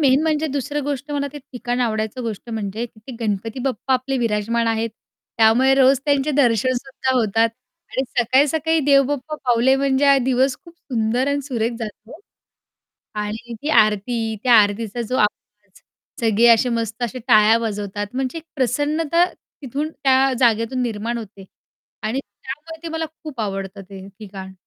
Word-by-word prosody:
Main 275 Hz, 0 st, +4 dB
म्हणजे 315 Hz, -1 st, +1 dB
दुसरी 285 Hz, +1 st, -2 dB
गोष्ट 285 Hz, +1 st, -4 dB
मला 285 Hz, 0 st, -1 dB
ते 295 Hz, -, -7 dB
ठिकाण 245 Hz, -2 st, -4 dB
आवडायचं 220 Hz, +1 st, -1 dB
गोष्ट 230 Hz, 0 st, -5 dB
म्हणजे 220 Hz, +1 st, -3 dB
ते 220 Hz, +4 st, -11 dB
गणपती 220 Hz, +3 st, -2 dB
बाप्पा 265 Hz, 0 st, -1 dB
आपले 260 Hz, +1 st, -1 dB
विराजमान 230 Hz, 0 st, 0 dB
आहेत. 225 Hz, 0 st, 0 dB, 0.5 s
त्यामुळे 240 Hz, +4 st, +5 dB
रोज 270 Hz, 0 st, +5 dB
त्यांचे 285 Hz, 0 st, +2 dB
दर्शनसुद्धा 260 Hz, 0 st, +1 dB
होतात 225 Hz, -1 st, +2 dB, 0.4 s
आणि 265 Hz, -, 0 dB, 0.2 s
सकाळी-सकाळी 295 Hz, +6 st, +3 dB
देव 275 Hz, -1 st, +6 dB
बाप्पा 290 Hz, +2 st, -3 dB
पावले, 245 Hz, +2 st, +4 dB
म्हणजे 275 Hz, 0 st, +1 dB
हा 275 Hz, -, +6 dB
दिवस 260 Hz, +1 st, +2 dB
खूप 335 Hz, 0 st, -15 dB
सुंदर 240 Hz, +2 st, -1 dB
आणि 285 Hz, 0 st, 0 dB
सुरेख 235 Hz, -3 st, -1 dB
जातो. 220 Hz, +6 st, -8 dB, 1.0 s
आणि 215 Hz, +3 st, -5 dB
ती 300 Hz, -, -2 dB
आरती, 220 Hz, 0 st, +2 dB
त्या 245 Hz, -2 st, +5 dB
आरतीचा 210 Hz, +3 st, +1 dB
जो 255 Hz, -, 0 dB
आवाज, 210 Hz, -2 st, -3 dB, 0.4 s
सगळे 225 Hz, +1 st, +3 dB
असे 235 Hz, +2 st, +5 dB
मस्त 225 Hz, +1 st, -4 dB
असे 255 Hz, +2 st, -4 dB
टाळ्या 215 Hz, 0 st, +6 dB
वाजवतात 205 Hz, -2 st, -3 dB
म्हणजे 265 Hz, +4 st, -2 dB
एक 320 Hz, -, -12 dB
प्रसन्नता 295 Hz, +6 st, +1 dB
तिथून 285 Hz, +3 st, -6 dB
त्या 270 Hz, -1 st, +3 dB
जागेतून 235 Hz, +1 st, +2 dB
निर्माण 235 Hz, 0 st, -2 dB
होते 200 Hz, -3 st, -10 dB, 0.6 s
आणि 230 Hz, +5 st, -1 dB
त्यामुळे 310 Hz, +5 st, -10 dB
ते 335 Hz, -, -5 dB
मला 325 Hz, 0 st, -2 dB, 0.2 s
खूप 290 Hz, -7 st, -7 dB
आवडतं 195 Hz, -1 st, -4 dB
ते 190 Hz, -1 st, -9 dB
ठिकाण. 190 Hz, -2 st, -9 dB
245 Hz, 155 wpm, -21 LUFS, 220-275 Hz, 1.0 s, देव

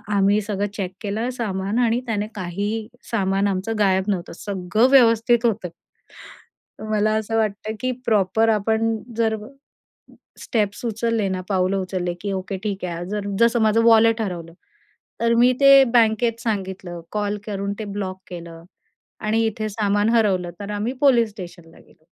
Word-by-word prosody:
आम्ही 200 Hz, +1 st, +3 dB
सगळं 205 Hz, -1 st, -2 dB
चेक 190 Hz, -3 st, -3 dB
केलं 215 Hz, +3 st, -2 dB
सामान 205 Hz, -3 st, -2 dB
आणि 240 Hz, 0 st, +2 dB
त्याने 210 Hz, -2 st, -1 dB
काहीही 205 Hz, +4 st, -3 dB, 0.2 s
सामान 195 Hz, -2 st, +1 dB
आमचं 195 Hz, +3 st, -2 dB
गायब 190 Hz, -2 st, +3 dB
नव्हतं. 185 Hz, -4 st, -2 dB
सगळं 200 Hz, +4 st, 0 dB
व्यवस्थित 235 Hz, -2 st, +4 dB
होतं. 210 Hz, -5 st, 0 dB, 1.2 s
मला 215 Hz, 0 st, +2 dB
असं 220 Hz, +1 st, -2 dB
वाटतं, 215 Hz, 0 st, -1 dB
की 255 Hz, 0 st, 0 dB
प्रॉपर 215 Hz, +1 st, +2 dB
आपण 220 Hz, +1 st, +1 dB, 0.2 s
जर 225 Hz, -1 st, +2 dB, 1.1 s
स्टेप्स 210 Hz, -2 st, -2 dB
उचलले 225 Hz, -2 st, 0 dB
ना, 185 Hz, -1 st, -2 dB
पाऊलं 190 Hz, -1 st, +1 dB
उचलले, 185 Hz, -2 st, -3 dB
की 200 Hz, +1 st, -3 dB
ओके 190 Hz, +1 st, -4 dB
ठीक 200 Hz, -3 st, -3 dB
आहे. 175 Hz, -1 st, -4 dB
जर 205 Hz, -1 st, -3 dB
जसं 235 Hz, 0 st, +4 dB
माझं 220 Hz, +1 st, +3 dB
वॉलेट 225 Hz, 0 st, +5 dB
हरवलं. 170 Hz, -5 st, -5 dB, 0.7 s
तर 230 Hz, 0 st, +3 dB
मी 245 Hz, +2 st, +5 dB
ते 275 Hz, 0 st, +8 dB
बँकेत 230 Hz, 0 st, +3 dB
सांगितलं, 190 Hz, -5 st, -4 dB
कॉल 210 Hz, -1 st, -1 dB
करून 200 Hz, -1 st, -3 dB
ते 220 Hz, -, -4 dB
ब्लॉक 190 Hz, -2 st, -4 dB
केलं 170 Hz, -2 st, -9 dB, 0.6 s
आणि 220 Hz, +1 st, +1 dB
इथे 215 Hz, 0 st, -2 dB
सामान 205 Hz, 0 st, +1 dB
हरवलं, 195 Hz, -7 st, +2 dB
तर 200 Hz, 0 st, -6 dB
आम्ही 210 Hz, +4 st, -2 dB
पोलीस 240 Hz, -6 st, +4 dB
स्टेशनला 175 Hz, -4 st, -11 dB
गेलो. 155 Hz, -, -24 dB
210 Hz, 150 wpm, -22 LUFS, 190-225 Hz, 1.2 s, ते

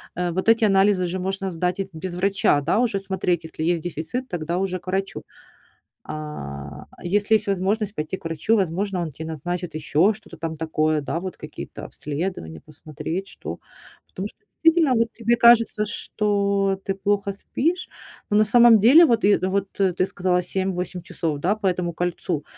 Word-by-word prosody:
э, 175 Hz, 0 st, -1 dB
вот 185 Hz, +5 st, -2 dB
эти 225 Hz, 0 st, +5 dB
анализы 195 Hz, -2 st, +4 dB
же 185 Hz, +2 st, -3 dB
можно 195 Hz, +1 st, -3 dB
сдать 180 Hz, +2 st, -1 dB
и 195 Hz, 0 st, -3 dB
без 175 Hz, +2 st, -5 dB
врача, 190 Hz, -5 st, +2 dB
да. 165 Hz, +9 st, +1 dB
Уже 225 Hz, -5 st, +1 dB
смотреть, 190 Hz, -3 st, -1 dB
если 160 Hz, -1 st, -6 dB
есть 170 Hz, 0 st, +1 dB
дефицит, 175 Hz, -, -4 dB
тогда 170 Hz, 0 st, -2 dB
уже 185 Hz, -1 st, -1 dB
к 185 Hz, -, -27 dB
врачу. 195 Hz, +1 st, -2 dB, 0.8 s
А, 70 Hz, -, -7 dB, 0.2 s
если 205 Hz, +4 st, +2 dB
есть 210 Hz, -1 st, 0 dB
возможность 200 Hz, +2 st, 0 dB
пойти 155 Hz, +4 st, -3 dB
к -, -, -22 dB
врачу, 165 Hz, +7 st, +1 dB
возможно, 190 Hz, 0 st, -1 dB
он 160 Hz, -3 st, -3 dB
тебе 160 Hz, +4 st, -8 dB
назначит 175 Hz, +2 st, -4 dB
ещё 160 Hz, +6 st, +2 dB
что-то 210 Hz, -5 st, -13 dB
там 160 Hz, 0 st, -4 dB
такое, 155 Hz, -1 st, 0 dB
да, 155 Hz, +3 st, -3 dB
вот 185 Hz, 0 st, -6 dB
какие-то -, -, -9 dB
обследования 145 Hz, -, -5 dB
посмотреть, 155 Hz, +4 st, -6 dB
что. -, -, -8 dB, 0.5 s
Потому 190 Hz, +2 st, -5 dB
что -, -, -19 dB, 0.3 s
действительно, 325 Hz, -4 st, +5 dB
вот 230 Hz, 0 st, +1 dB
тебе 235 Hz, +1 st, +1 dB
кажется, 230 Hz, -2 st, +5 dB
что 200 Hz, -2 st, 0 dB
ты 195 Hz, -, 0 dB
плохо 200 Hz, +1 st, 0 dB
спишь, 325 Hz, -, -2 dB, 0.4 s
но 210 Hz, -, +3 dB
на 215 Hz, -, +6 dB
самом 235 Hz, +1 st, +6 dB
деле, 270 Hz, -, +8 dB
вот 235 Hz, -6 st, +2 dB
и 205 Hz, +1 st, +5 dB
вот 190 Hz, +1 st, -1 dB
ты 185 Hz, -2 st, +2 dB
сказала 180 Hz, -1 st, 0 dB
7-8 180 Hz, -1 st, -3 dB
часов, 155 Hz, -3 st, -3 dB
да, 185 Hz, +8 st, +1 dB
по 215 Hz, -2 st, -2 dB
этому 180 Hz, -1 st, -1 dB
кольцу. 175 Hz, -2 st, -2 dB
185 Hz, 175 wpm, -23 LUFS, 165-205 Hz, 0.8 s, деле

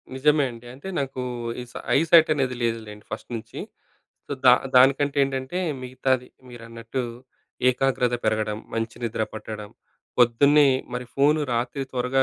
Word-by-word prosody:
నిజమే 150 Hz, +2 st, +3 dB
అండి. 120 Hz, 0 st, -13 dB
అంటే 140 Hz, +8 st, -10 dB
నాకు 135 Hz, -2 st, -3 dB, 0.4 s
ఈ -, -, -6 dB
సై -, -, -6 dB, 0.2 s
ఐ -, -, +5 dB
సైట్ 165 Hz, -1 st, +7 dB
అనేది 130 Hz, -3 st, -1 dB
లేదులేండి 110 Hz, -3 st, -3 dB
ఫస్ట్ -, -, -6 dB
నుంచి. 110 Hz, -, -8 dB, 0.7 s
సో, -, -, -5 dB
దా 125 Hz, -, +10 dB, 0.2 s
దానికంటేంటంటే, 135 Hz, +2 st, +3 dB, 0.2 s
మిగతాది 130 Hz, 0 st, -1 dB, 0.2 s
మీరన్నట్టు 115 Hz, +1 st, -6 dB, 0.7 s
ఏకాగ్రత 125 Hz, -1 st, +1 dB
పెరగడం, 110 Hz, -1 st, 0 dB, 0.2 s
మంచి 115 Hz, 0 st, -3 dB
నిద్ర 110 Hz, -1 st, -1 dB
పట్టడం 105 Hz, -1 st, -7 dB, 0.5 s
పొద్దున్నే 140 Hz, +5 st, +5 dB, 0.3 s
మరి 125 Hz, 0 st, -3 dB
ఫోను 150 Hz, +2 st, +3 dB
రాత్రి 120 Hz, +4 st, -1 dB
త్వరగా 130 Hz, +1 st, +1 dB
125 Hz, 135 wpm, -24 LUFS, 115-135 Hz, 0.7 s, దా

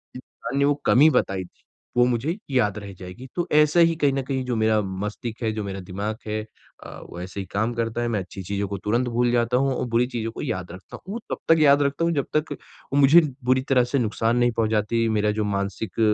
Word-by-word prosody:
इंसान 130 Hz, +1 st, -7 dB
ने 140 Hz, -, +4 dB
वो 145 Hz, -, +4 dB
कमी 145 Hz, +5 st, +6 dB
बताई 95 Hz, -9 st, 0 dB
थी, -, -, -24 dB, 0.3 s
वो 120 Hz, -, +6 dB
मुझे 125 Hz, +7 st, 0 dB, 0.2 s
याद 110 Hz, -6 st, +1 dB
रह 100 Hz, -1 st, -9 dB
जाएगी। 90 Hz, +8 st, -9 dB
तो 175 Hz, 0 st, -1 dB
ऐसा 150 Hz, +2 st, +5 dB
ही 165 Hz, -1 st, +5 dB
कहीं 140 Hz, -2 st, +3 dB
न 135 Hz, -, 0 dB
कहीं 130 Hz, 0 st, -2 dB
जो 125 Hz, -1 st, -1 dB
मेरा 110 Hz, -1 st, +2 dB
मस्तिष्क 105 Hz, +5 st, -5 dB
है, 110 Hz, -, +1 dB
जो 110 Hz, -1 st, -3 dB
मेरा 95 Hz, -1 st, -5 dB
दिमाग़ 100 Hz, +4 st, -4 dB
है 110 Hz, 0 st, -1 dB, 0.4 s
अ, -, -, -8 dB, 0.2 s
वो 85 Hz, -, -9 dB
ऐसे 95 Hz, +2 st, -7 dB
ही 95 Hz, -, -4 dB
काम 110 Hz, +4 st, 0 dB
करता 115 Hz, 0 st, -2 dB
है। 120 Hz, -, 0 dB
मैं 110 Hz, -3 st, 0 dB
अच्छी 95 Hz, +1 st, -8 dB
चीज़ों 100 Hz, +2 st, -2 dB
को 100 Hz, +1 st, -4 dB
तुरंत 115 Hz, +6 st, 0 dB
भूल 120 Hz, +1 st, +1 dB
जाता 120 Hz, 0 st, +2 dB
हूँ 135 Hz, 0 st, +1 dB
और -, -, -2 dB
बुरी 115 Hz, +2 st, +2 dB
चीज़ों 115 Hz, -3 st, -4 dB
को -, -, -7 dB
याद 95 Hz, -, -4 dB
रखता 95 Hz, +1 st, -11 dB
हूँ। 190 Hz, -, -9 dB
वो 230 Hz, -, -4 dB
तब -, -, -1 dB, 0.2 s
तक 165 Hz, -, +2 dB
याद 145 Hz, -1 st, +6 dB
रखता 140 Hz, +4 st, 0 dB
हूँ 170 Hz, -, +1 dB
जब 140 Hz, -4 st, 0 dB
तक 155 Hz, 0 st, -2 dB, 0.4 s
वो 140 Hz, -, +3 dB
मुझे 145 Hz, +5 st, +7 dB, 0.2 s
बुरी 130 Hz, +1 st, +3 dB
तरह 130 Hz, -2 st, +4 dB
से 125 Hz, +3 st, 0 dB
नुक़सान 115 Hz, +1 st, 0 dB
नहीं 120 Hz, 0 st, +3 dB
पहुँचाती, 110 Hz, +1 st, +1 dB
मेरा 105 Hz, -1 st, +1 dB
जो 105 Hz, +1 st, -1 dB
मानसिक 100 Hz, +2 st, -3 dB
115 Hz, 245 wpm, -24 LUFS, 105-135 Hz, 0.4 s, मुझे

